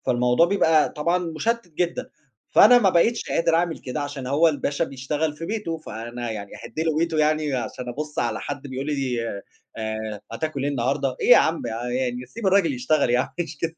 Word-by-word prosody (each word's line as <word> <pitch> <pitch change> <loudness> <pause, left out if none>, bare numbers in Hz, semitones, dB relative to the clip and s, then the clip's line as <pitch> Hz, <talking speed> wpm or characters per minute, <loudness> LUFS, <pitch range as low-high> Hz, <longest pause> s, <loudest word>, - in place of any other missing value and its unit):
فالموضوع 125 +5 +3
بيبقى 165 -5 +3
طبعًا 170 +4 0
مُشتِّت 180 +6 -2
جدًا، 170 +2 -2 0.4
فأنا 245 0 +8
ما 195 -5 +4
بقيتش 225 +8 +2
قادر 165 0 +2
أعمل 170 -1 +1
كده 130 +4 -5
عشان 145 -3 -5
هو 150 +5 +4
الباشا 145 -1 -1
بيشتغل 145 +4 -2
في 165 - -6
بيته، 190 -7 -3
فأنا 120 -3 -6
يعني 100 -2 -6
أهِدْ - - -7
له 160 -1 0
بيته 165 -1 0
يعني 155 -2 +1
عشان 125 +1 -4
أبُصّ 150 +5 -5
على - - 0
حد 145 -1 -5
بيقول 135 +1 -5
لي، 130 -6 -1 0.5
آآ 110 -1 -4
هتاكل 140 +3 -3
إيه 145 - 0
النهارده؟ 130 0 -1
إيه - - +1
يا 165 - +11
عم 165 0 +2
يعني 125 +2 -3
سيب 195 - -6
الراجل 190 -6 +3
يشتغل 125 +2 +1
يعني 125 +1 0
مش 165 -3 -4
كده. 165 +2 -3
145 Hz, 185 wpm, -24 LUFS, 125-165 Hz, 0.5 s, يا